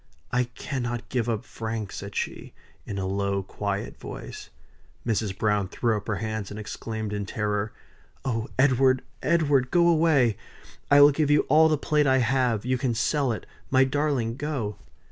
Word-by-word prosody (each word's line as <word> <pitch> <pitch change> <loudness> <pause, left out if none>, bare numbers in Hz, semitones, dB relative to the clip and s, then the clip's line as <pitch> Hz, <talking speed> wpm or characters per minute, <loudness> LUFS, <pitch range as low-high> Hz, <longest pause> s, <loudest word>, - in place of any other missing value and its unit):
"I 125 0 +2
cannot 120 0 -4
give 120 -2 -1
up 115 +1 -2
Frank," 110 -2 -5
said 100 0 -7
she, - - -4 0.3
in 100 - -4
a 95 - -2
low, 100 0 -1
quiet 100 +1 -4
voice. - - -8 0.6
Mrs. 105 -4 -1
Browne 105 -2 +1
threw 115 +3 0
up 105 - -5
her 105 - 0
hands 110 -2 -3
and 105 - -7
exclaimed 110 0 -5
in 100 -1 -3
terror: 105 0 -1 0.5
"Oh 115 -3 -1
Edward, 130 -1 +4 0.2
Edward! 145 -6 +2
go 170 +2 +4
away 155 - +4 0.5
I 145 0 +7
will 145 +1 +9
give 145 +1 0
you 145 0 +5
all 160 +3 +6
the 155 - +2
plate 150 0 +1
I 130 0 +4
have; 125 -3 +1
you 130 0 0
can 120 -2 0
sell 135 +4 +1
it 110 - -4 0.2
my 130 0 +5
darling, 130 -4 0
go!" 135 -9 -3
120 Hz, 170 wpm, -26 LUFS, 105-135 Hz, 0.6 s, will